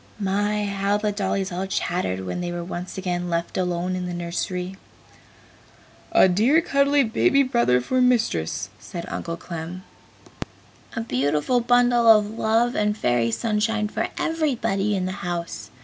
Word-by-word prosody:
My, 205 Hz, +1 st, 0 dB
how 200 Hz, 0 st, 0 dB
the 210 Hz, 0 st, -1 dB
dollies 195 Hz, -1 st, -2 dB
all 185 Hz, +2 st, -3 dB
chattered 175 Hz, -, -1 dB
when 135 Hz, -, -3 dB
they 175 Hz, 0 st, -3 dB
were 175 Hz, 0 st, -4 dB
once 180 Hz, +1 st, -6 dB
again 180 Hz, -1 st, -2 dB
left 170 Hz, 0 st, -2 dB
alone 180 Hz, 0 st, -1 dB
in 180 Hz, -1 st, -3 dB
the 175 Hz, -, -4 dB
nursery! 180 Hz, +2 st, -3 dB, 1.3 s
"A -, -, +6 dB
dear 220 Hz, -, +4 dB
cuddly 280 Hz, -2 st, +3 dB
baby 275 Hz, +4 st, +3 dB
brother 235 Hz, -, +2 dB
for 255 Hz, -, 0 dB
Mistress!" 155 Hz, -, +1 dB
said 170 Hz, -1 st, -7 dB
Uncle 165 Hz, 0 st, -4 dB
Clem. 170 Hz, +2 st, -7 dB, 1.1 s
"A 225 Hz, -, -1 dB
beautiful 150 Hz, -, +1 dB
bundle 245 Hz, 0 st, +3 dB
of 215 Hz, -2 st, +6 dB
love 225 Hz, +2 st, +1 dB
and 210 Hz, 0 st, 0 dB
Fairy 120 Hz, -, +1 dB
Sunshine 215 Hz, -, 0 dB
for -, -, -2 dB
everybody 245 Hz, -11 st, 0 dB
in 185 Hz, -1 st, -1 dB
the 185 Hz, -, -2 dB
house!" 170 Hz, -, -4 dB
195 Hz, 150 wpm, -23 LUFS, 175-225 Hz, 1.3 s, A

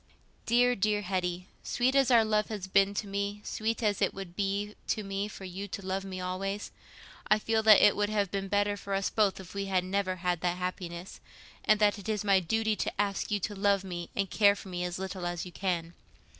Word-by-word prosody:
"Dear, 245 Hz, +1 st, +4 dB
dear 210 Hz, 0 st, +1 dB
Hetty, 180 Hz, -1 st, -2 dB, 0.2 s
sweet 250 Hz, +2 st, +1 dB
as 275 Hz, -2 st, +4 dB
our 230 Hz, -3 st, +6 dB
love 215 Hz, -1 st, +1 dB
has 210 Hz, -4 st, -5 dB
been 195 Hz, +1 st, +3 dB
to 210 Hz, -, -2 dB
me, 200 Hz, +1 st, -3 dB
sweet 225 Hz, +2 st, -2 dB
as 205 Hz, -2 st, +1 dB
it -, -, +1 dB
would 190 Hz, -3 st, -8 dB
be 200 Hz, +1 st, -1 dB
to 215 Hz, -, -1 dB
me 195 Hz, +1 st, -2 dB
for 200 Hz, -, -10 dB
you 190 Hz, +2 st, -6 dB
to 200 Hz, 0 st, -7 dB
love 190 Hz, +1 st, -2 dB
me 190 Hz, -1 st, -6 dB
always, 195 Hz, +3 st, -3 dB, 0.6 s
I 215 Hz, -, +5 dB
feel 220 Hz, +1 st, +1 dB
that 215 Hz, -2 st, +8 dB
it 205 Hz, -, +6 dB
would 205 Hz, 0 st, 0 dB
have 205 Hz, -3 st, 0 dB
been 195 Hz, -1 st, -2 dB
better 205 Hz, +1 st, +1 dB
for 200 Hz, -1 st, -4 dB
us 195 Hz, 0 st, 0 dB
both 205 Hz, -3 st, +2 dB
if 185 Hz, -2 st, -10 dB
we 200 Hz, 0 st, -2 dB
had 190 Hz, -2 st, +1 dB
never 185 Hz, 0 st, -1 dB
had 180 Hz, -2 st, -1 dB
that 175 Hz, 0 st, 0 dB
happiness, 180 Hz, -1 st, -5 dB, 0.5 s
and 215 Hz, -1 st, +4 dB
that 210 Hz, 0 st, +3 dB
it 200 Hz, -, -7 dB
is 210 Hz, -2 st, -1 dB
my 195 Hz, -2 st, +4 dB
duty 220 Hz, +5 st, 0 dB
to -, -, -3 dB
ask 200 Hz, -1 st, 0 dB
you 205 Hz, -1 st, +1 dB
to 205 Hz, -, -2 dB
love 200 Hz, -1 st, +2 dB
me 175 Hz, -2 st, -6 dB
and 195 Hz, 0 st, 0 dB
care 200 Hz, +1 st, +4 dB
for 195 Hz, -, -10 dB
me 180 Hz, -1 st, -3 dB
as 180 Hz, 0 st, -3 dB
little 185 Hz, -1 st, -4 dB
as 175 Hz, 0 st, -3 dB
you 180 Hz, -, -9 dB
can. 175 Hz, -2 st, -2 dB
195 Hz, 230 wpm, -30 LUFS, 185-210 Hz, 0.6 s, that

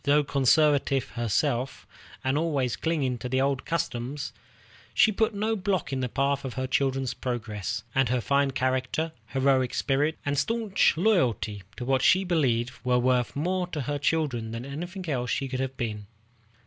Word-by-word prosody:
Though 145 Hz, +1 st, +4 dB
conservative 140 Hz, -2 st, +3 dB
herself, 120 Hz, +4 st, -1 dB, 0.4 s
and 130 Hz, +1 st, +1 dB
always 145 Hz, -6 st, 0 dB
clinging 140 Hz, -7 st, -1 dB
to 125 Hz, -, -5 dB
the 130 Hz, +1 st, +1 dB
old 135 Hz, -1 st, 0 dB
customs, 140 Hz, -3 st, -3 dB, 0.6 s
she 220 Hz, -, +6 dB
put 220 Hz, +1 st, +1 dB
no 215 Hz, +2 st, 0 dB
block 185 Hz, -7 st, -1 dB
in 135 Hz, -, -1 dB
the 125 Hz, -1 st, -1 dB
path 140 Hz, +3 st, 0 dB
of 130 Hz, -3 st, -5 dB
her 130 Hz, 0 st, -1 dB
children's 135 Hz, 0 st, 0 dB
progress, 110 Hz, -3 st, -4 dB
and 135 Hz, -2 st, +2 dB
her 125 Hz, 0 st, +1 dB
fine 140 Hz, +3 st, +2 dB
character, 130 Hz, +4 st, -1 dB, 0.2 s
heroic 130 Hz, -2 st, +2 dB
spirit, 145 Hz, +3 st, +1 dB
and 145 Hz, -1 st, +1 dB
stanch 225 Hz, -7 st, +2 dB
loyalty 130 Hz, -, +1 dB, 0.2 s
to 120 Hz, -, -4 dB
what 135 Hz, 0 st, +2 dB
she 185 Hz, +6 st, +5 dB
believed 130 Hz, -9 st, +1 dB
were 125 Hz, -1 st, +2 dB
worth 125 Hz, 0 st, +1 dB
more 180 Hz, +5 st, 0 dB
to 160 Hz, -4 st, -4 dB
her 145 Hz, +2 st, -2 dB
children 140 Hz, -7 st, 0 dB
than 115 Hz, +2 st, -5 dB
anything 175 Hz, +6 st, -6 dB
else 125 Hz, -5 st, 0 dB
could 130 Hz, -1 st, -3 dB
have 130 Hz, 0 st, -3 dB
been. 105 Hz, -4 st, -4 dB
135 Hz, 165 wpm, -27 LUFS, 125-155 Hz, 0.6 s, she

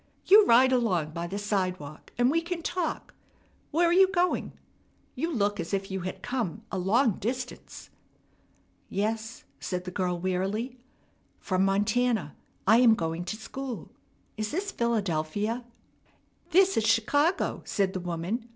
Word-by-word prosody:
"You 415 Hz, +2 st, +7 dB
ride 255 Hz, +3 st, +6 dB
along 185 Hz, -11 st, +1 dB
by 170 Hz, +2 st, -4 dB
the 195 Hz, +3 st, -4 dB
sidewalk, 185 Hz, -7 st, -3 dB
and 245 Hz, +2 st, +3 dB
we 330 Hz, +2 st, +2 dB
can 335 Hz, 0 st, -5 dB
talk. 350 Hz, -1 st, -3 dB, 0.6 s
Where 340 Hz, +3 st, +3 dB
are 340 Hz, -, +3 dB
you 380 Hz, +1 st, +7 dB
going? 360 Hz, -1 st, 0 dB, 0.6 s
You 335 Hz, +1 st, -2 dB
look 205 Hz, -6 st, 0 dB
as 170 Hz, -, -1 dB
if 195 Hz, 0 st, -4 dB
you 190 Hz, -, -2 dB
had 185 Hz, +1 st, -6 dB
come 235 Hz, -5 st, -3 dB
a 190 Hz, -, -2 dB
long 215 Hz, +4 st, +2 dB
distance." 250 Hz, +3 st, -5 dB, 1.0 s
"Yes," 220 Hz, +3 st, -2 dB, 0.2 s
said 180 Hz, -1 st, -3 dB
the 180 Hz, -, -6 dB
girl 180 Hz, -1 st, -1 dB
wearily, 195 Hz, +8 st, -2 dB, 0.6 s
"from 185 Hz, -1 st, 0 dB
Montana. 205 Hz, -, +1 dB, 0.3 s
I 225 Hz, -, +6 dB
am 235 Hz, -2 st, +6 dB
going 165 Hz, -1 st, -3 dB
to 215 Hz, -, -3 dB
school. 260 Hz, +2 st, -7 dB, 0.5 s
Is 215 Hz, -1 st, -2 dB
this 390 Hz, -, -2 dB
Philadelphia?" 210 Hz, -, -1 dB, 0.8 s
"This 380 Hz, +2 st, +4 dB
is 225 Hz, -, +3 dB
Chicago," 285 Hz, -, +2 dB
said 195 Hz, -2 st, 0 dB
the 185 Hz, -, -2 dB
woman. 180 Hz, +7 st, -3 dB
220 Hz, 145 wpm, -28 LUFS, 185-255 Hz, 1.0 s, You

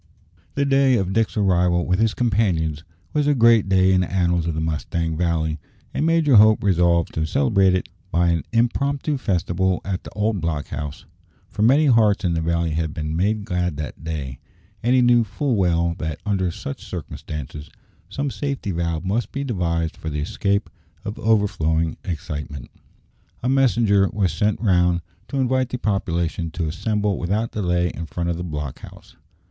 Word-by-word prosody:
The 140 Hz, -, +1 dB
day 135 Hz, -1 st, +4 dB
of 95 Hz, -2 st, -1 dB
Dick's 110 Hz, +1 st, 0 dB
arrival 90 Hz, -3 st, +2 dB
with 90 Hz, 0 st, +1 dB
his 110 Hz, -1 st, +2 dB
companions 90 Hz, -, 0 dB, 0.3 s
was 150 Hz, -1 st, +1 dB
a 145 Hz, -, +3 dB
great 115 Hz, -4 st, +5 dB
day 95 Hz, 0 st, +4 dB
in 90 Hz, -, +3 dB
the 90 Hz, -, -3 dB
annals 85 Hz, -2 st, +1 dB
of 80 Hz, -, -1 dB
the -, -, -2 dB
Mustang 80 Hz, +1 st, -2 dB
Valley, 80 Hz, -2 st, -1 dB, 0.3 s
and 155 Hz, -, 0 dB
Major 160 Hz, -7 st, +4 dB
Hope 110 Hz, +1 st, +6 dB
resolved 85 Hz, -3 st, +2 dB
to 80 Hz, 0 st, -1 dB
celebrate 100 Hz, -, +3 dB
it 90 Hz, -, -2 dB, 0.2 s
by 85 Hz, +1 st, +2 dB
an 85 Hz, -3 st, +1 dB
impromptu 140 Hz, +5 st, 0 dB
festival 90 Hz, -2 st, 0 dB
at 95 Hz, -1 st, -3 dB
the -, -, -9 dB
old 105 Hz, -2 st, 0 dB
block 75 Hz, -3 st, -2 dB
house; 75 Hz, 0 st, -6 dB, 0.5 s
for 105 Hz, -, -4 dB
many 135 Hz, +8 st, +5 dB
hearts 110 Hz, -7 st, +3 dB
in 85 Hz, -, +1 dB
the 80 Hz, -, 0 dB
valley 85 Hz, 0 st, 0 dB
had 80 Hz, 0 st, -2 dB
been 75 Hz, 0 st, -3 dB
made 100 Hz, +4 st, 0 dB
glad 90 Hz, -5 st, -1 dB
that 75 Hz, +1 st, -6 dB
day, 70 Hz, -5 st, -5 dB, 0.4 s
and 125 Hz, +2 st, +2 dB
he 125 Hz, -, +4 dB
knew 120 Hz, -1 st, +5 dB
full 115 Hz, +5 st, -1 dB
well 85 Hz, -3 st, +1 dB
that, 80 Hz, -2 st, -4 dB
under 95 Hz, -3 st, 0 dB
such 70 Hz, -4 st, -7 dB
circumstances, 75 Hz, 0 st, -7 dB, 0.4 s
some 140 Hz, +7 st, -3 dB
safety 140 Hz, -8 st, -3 dB
valve 85 Hz, -1 st, -2 dB
must 110 Hz, +5 st, -1 dB
be 140 Hz, -, -3 dB
devised 85 Hz, -, -1 dB
for 80 Hz, -, -6 dB
the 75 Hz, -1 st, -3 dB
escape 100 Hz, +6 st, -1 dB, 0.4 s
of 105 Hz, -, -5 dB
overflowing 80 Hz, -7 st, +1 dB
excitement. 75 Hz, -5 st, -6 dB, 0.7 s
A 125 Hz, -, +1 dB
messenger 115 Hz, -7 st, +3 dB
was 100 Hz, -4 st, 0 dB
sent 105 Hz, -1 st, 0 dB
round 90 Hz, -4 st, +3 dB, 0.3 s
to 140 Hz, -, -4 dB
invite 130 Hz, 0 st, +1 dB
the 125 Hz, -, -3 dB
population 85 Hz, -6 st, -1 dB
to 85 Hz, -3 st, -2 dB
assemble 105 Hz, +3 st, -1 dB
without 105 Hz, +6 st, -1 dB
delay 90 Hz, -3 st, 0 dB
in 85 Hz, 0 st, -6 dB
front 85 Hz, +2 st, -2 dB
of 85 Hz, -, -3 dB
the 90 Hz, -, -4 dB
block 75 Hz, -5 st, -5 dB
house. -, -, -14 dB
90 Hz, 175 wpm, -22 LUFS, 85-110 Hz, 0.7 s, Hope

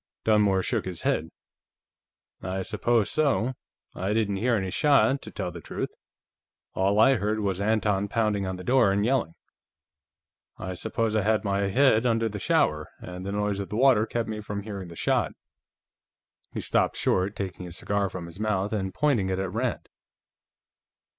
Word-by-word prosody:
Dunmore 105 Hz, -3 st, +3 dB
shook 115 Hz, 0 st, -1 dB
his 90 Hz, -3 st, -5 dB
head. -, -, 0 dB, 1.1 s
"I 95 Hz, +1 st, -3 dB
suppose 110 Hz, +1 st, +1 dB
so. 130 Hz, -6 st, +1 dB, 0.4 s
I 95 Hz, +3 st, -2 dB
didn't 105 Hz, -3 st, +1 dB
hear 120 Hz, +4 st, +2 dB
any 95 Hz, -3 st, -2 dB
shot, 140 Hz, -, +3 dB
to -, -, -9 dB
tell 90 Hz, -, -4 dB
the 85 Hz, 0 st, -9 dB
truth. -, -, -4 dB, 0.8 s
All 100 Hz, +2 st, +2 dB
I 130 Hz, +4 st, +6 dB
heard 105 Hz, +1 st, -1 dB
was 95 Hz, -2 st, -1 dB
Anton 105 Hz, -2 st, +1 dB
pounding 105 Hz, -2 st, 0 dB
on 95 Hz, -, -3 dB
the 90 Hz, -, -8 dB
door 125 Hz, -4 st, +4 dB
and 100 Hz, +1 st, +1 dB
yelling. 120 Hz, -10 st, 0 dB, 1.2 s
I 95 Hz, -, -5 dB
suppose 110 Hz, +3 st, -1 dB
I 110 Hz, -, +3 dB
had 110 Hz, +2 st, +1 dB
my 100 Hz, -1 st, 0 dB
head 125 Hz, +1 st, +4 dB
under 115 Hz, -1 st, +2 dB
the 105 Hz, -1 st, -5 dB
shower, -, -, +1 dB
and 90 Hz, 0 st, -8 dB
the -, -, -2 dB
noise 105 Hz, -1 st, -1 dB
of 100 Hz, -, -5 dB
the 105 Hz, -, -3 dB
water 120 Hz, -4 st, +4 dB
kept 115 Hz, -1 st, -2 dB
me 110 Hz, -1 st, -4 dB
from 100 Hz, -1 st, -5 dB
hearing 100 Hz, -3 st, -6 dB
the 85 Hz, -, -10 dB
shot." -, -, +1 dB, 1.2 s
He -, -, -4 dB
stopped -, -, +1 dB
short, 95 Hz, +3 st, +1 dB
taking 95 Hz, -2 st, -5 dB
his 85 Hz, +1 st, -8 dB
cigar 100 Hz, -1 st, -1 dB
from 90 Hz, -1 st, -6 dB
his 85 Hz, +3 st, -11 dB
mouth 105 Hz, -1 st, 0 dB
and 95 Hz, -3 st, -2 dB
pointing 130 Hz, -11 st, +2 dB
it 95 Hz, -, -1 dB
at 95 Hz, 0 st, -3 dB
Rand. -, -, -2 dB
105 Hz, 175 wpm, -26 LUFS, 95-110 Hz, 1.2 s, I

